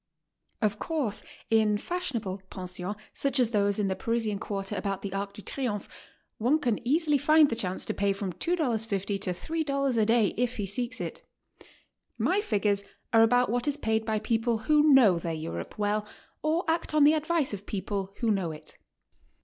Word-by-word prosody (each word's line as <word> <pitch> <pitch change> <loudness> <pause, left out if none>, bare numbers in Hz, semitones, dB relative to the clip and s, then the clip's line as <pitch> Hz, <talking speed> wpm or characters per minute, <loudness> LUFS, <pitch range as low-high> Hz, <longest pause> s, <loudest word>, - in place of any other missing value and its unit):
Of 210 -1 +1
course, 280 -11 -2 0.3
in 215 -2 +4
fas'hionable 230 - -3
pensions, 185 +2 -4 0.2
such 275 0 0
as 240 -2 +3
those 205 -2 +2
in 205 -2 +1
the 190 - -1
Parisian 225 -3 -1
quarter 200 0 -4
about 195 -1 -3
the 195 -2 -4
Arc 200 0 -3
de 210 - -11
Triomphe, 230 -7 -3 0.5
one 250 +8 +3
can 245 -8 0
easily 300 0 +3
find 305 +1 +5
the - - 0
chance 190 -5 -1
to - - -1
pay 200 0 +1
from 195 -2 -3
$2.50 220 - -1
to 200 - -2
$3 275 - -1
a 215 - +4
day 225 -3 +3
if 245 +1 0
he 205 - -1
seeks 240 +6 -3
it. - - -5 1.0
My 395 +3 +2
figures 205 - 0 0.3
are 225 - +7
about 245 0 +4
what 245 +3 -1
is 290 0 +1
paid 220 -5 0
by 220 -1 0
people 225 +2 0
who 300 0 +5
know 220 -11 +6
'their 165 0 -3
Europe 160 +1 -6
well 210 0 0 0.3
or 320 +3 0
act 325 -1 0
on 300 - +6
the 295 +2 +7
advice 315 -4 0
<of 200 0 -7
people 195 -1 -3
who 230 -2 +2
know 190 -5 0
it. 155 0 -12
220 Hz, 180 wpm, -28 LUFS, 200-275 Hz, 1.0 s, are